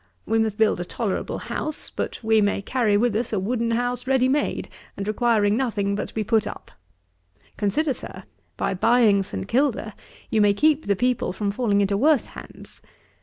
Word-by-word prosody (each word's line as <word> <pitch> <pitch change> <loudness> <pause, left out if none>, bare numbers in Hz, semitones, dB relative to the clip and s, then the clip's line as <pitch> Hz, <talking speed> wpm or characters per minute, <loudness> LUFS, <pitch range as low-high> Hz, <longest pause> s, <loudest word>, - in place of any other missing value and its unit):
We 225 0 +1
must 220 -2 0
build 220 -4 +2
a - - -2
tolerable 200 +2 -3
house: 310 0 -5
but - - -4
we 220 -1 +3
may 205 -1 0
carry 220 -3 +1
with 230 0 +1
us 225 +2 -1
a 210 - 0
wooden 230 +4 -1
house 245 +2 -1
ready 260 -1 +3
made, 285 +3 -1 0.3
and 200 - -4
requiring 215 -1 +2
nothing 220 -6 -1
but 200 - -2
to - - -15
be 220 - 0
put 220 0 +1
up. - - -9 0.8
Consider, 275 +8 0
Sir, - - -9 0.3
by - - -1
buying 215 0 +4
St. 95 - -5
Kilda, 245 -4 0 0.4
you 220 - +3
may 205 -1 +4
keep 305 +5 +2
the 200 - +2
people 245 -2 0
from 200 0 -2
falling 205 -2 +1
into 200 0 +1
worse 290 +3 +3
hands. - - -12
220 Hz, 185 wpm, -23 LUFS, 205-245 Hz, 0.8 s, buying